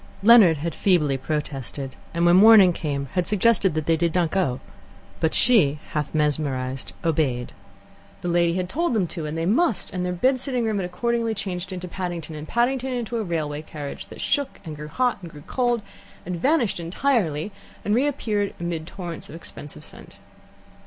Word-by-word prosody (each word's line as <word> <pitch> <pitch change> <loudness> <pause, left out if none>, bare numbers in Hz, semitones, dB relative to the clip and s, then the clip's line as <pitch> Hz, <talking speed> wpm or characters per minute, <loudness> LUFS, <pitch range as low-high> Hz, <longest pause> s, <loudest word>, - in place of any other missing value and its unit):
Leonard 210 -8 +7
had 160 +2 -3
feebly 160 -8 +2
protested, 135 -2 -4 0.2
and 170 +1 0
when 175 0 +6
the 185 - +7
morning 210 -5 +8
came, 140 -4 -3
had 180 -1 +1
suggested 210 -4 +3
that 155 -1 -1
they 165 - +3
shouldn't 170 0 +1
go. 155 -10 0 0.6
But 160 - +1
she, 185 - +4
half 150 0 -3
mesmerized, 135 -4 -1
had 170 - +2
obeyed. 130 -6 0 0.7
The - - -4
lady 170 0 +2
had 185 -1 -1
told 320 - -1
them 200 -4 +2
to, 165 -4 -4
and 155 +2 -4
they 165 - -1
must, 235 - +1
and 180 -1 -2
their 180 - -1
bed 255 +9 +2
sitting 250 -3 -1
room 215 -2 0
had 185 - -2
accordingly 230 +4 -1
changed 185 -2 -4
into 180 -1 -5
Paddington, 175 -3 -5
and 150 0 -7
Paddington 255 +2 0
into 240 -1 -3
a 225 - -1
railway 155 -5 -3
carriage, 150 -2 -7
that - - -10
shook, 285 -2 -1
and 155 -2 -6
grew 150 +1 -8
hot, 245 +8 0
and 175 - -8
grew 150 -2 -13
cold, 240 -3 0 0.4
and 180 +1 -3
vanished 245 - +1
entirely, 175 - 0 0.3
and 205 - +1
reappeared 225 -6 0
amid 170 -2 -4
torrents 175 -3 -7
of - - -9
expensive 150 -3 -10
scent. - - -13
175 Hz, 185 wpm, -24 LUFS, 155-220 Hz, 0.7 s, morning